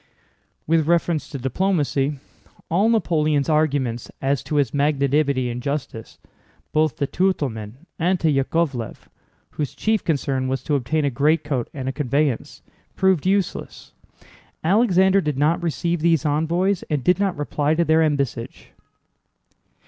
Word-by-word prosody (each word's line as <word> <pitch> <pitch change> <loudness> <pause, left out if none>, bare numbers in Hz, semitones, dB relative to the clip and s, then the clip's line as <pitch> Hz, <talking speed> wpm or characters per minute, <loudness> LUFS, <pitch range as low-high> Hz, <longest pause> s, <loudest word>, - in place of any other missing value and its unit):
With 160 -1 +2
reference 170 -3 +1
to 140 - -5
diplomacy, 145 0 0 0.5
all 195 +7 +3
Napoleon's 155 -9 +1
arguments 140 -6 0
as 135 -1 0
to 150 - -3
his 140 -5 +1
magnanimity 140 -2 +1
and 120 +1 -5
justice, 140 -5 -5 0.5
both 155 -3 +1
to 140 - -1
Tutólmin 135 - -1 0.3
and 180 +2 +1
to 165 - +1
Yákovlev 135 -3 -1 0.6
(whose 145 -3 -4
chief 220 -1 0
concern 135 -5 -1
was 130 0 -2
to 150 - -2
obtain 145 +3 0
a 140 - +1
greatcoat 145 -2 0
and 130 -3 -6
a - - 0
conveyance), 140 -1 -1 0.3
proved 190 -3 +2
useless; 195 -1 -2 0.7
Alexander 190 0 +4
did 150 -5 -2
not 155 +5 +2
receive 170 +1 -1
these 165 -2 +2
envoys 170 +6 +1
and 145 -4 -1
did 180 +6 +3
not 195 -5 0
reply 145 +1 0
to 170 +1 +2
their 160 0 +4
embassage. 140 -6 -2
150 Hz, 135 wpm, -22 LUFS, 135-170 Hz, 0.7 s, Alexander